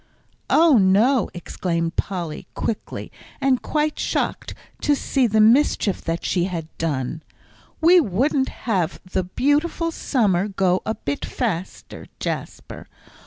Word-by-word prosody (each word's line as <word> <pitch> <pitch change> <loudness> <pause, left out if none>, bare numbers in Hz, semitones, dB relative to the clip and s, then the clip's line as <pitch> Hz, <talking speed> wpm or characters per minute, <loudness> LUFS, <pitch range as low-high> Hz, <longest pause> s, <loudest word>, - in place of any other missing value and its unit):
"Oh, 320 -7 +5
no," 210 +6 +3
exclaimed 170 -1 -3
Polly, 175 -5 -4
quickly, 225 - -4 0.3
and 265 -2 +2
quite 300 0 -1
shocked - - -2 0.3
to 295 - +3
see 270 -2 +1
the 220 0 +1
mischief 225 -3 +3
that 165 0 -2
she 175 -2 +1
had 165 -4 -5
done. 150 -1 -2 0.6
"We 350 +3 +7
wouldn't 265 - +1 0.2
have 185 -7 0
the 185 +1 -1
beautiful 295 - 0
summer 205 - +1
go 190 -2 +1
a 220 - 0
bit 140 0 -4
faster, 195 -8 -4
Jasper. - - -5
205 Hz, 120 wpm, -22 LUFS, 175-270 Hz, 0.6 s, We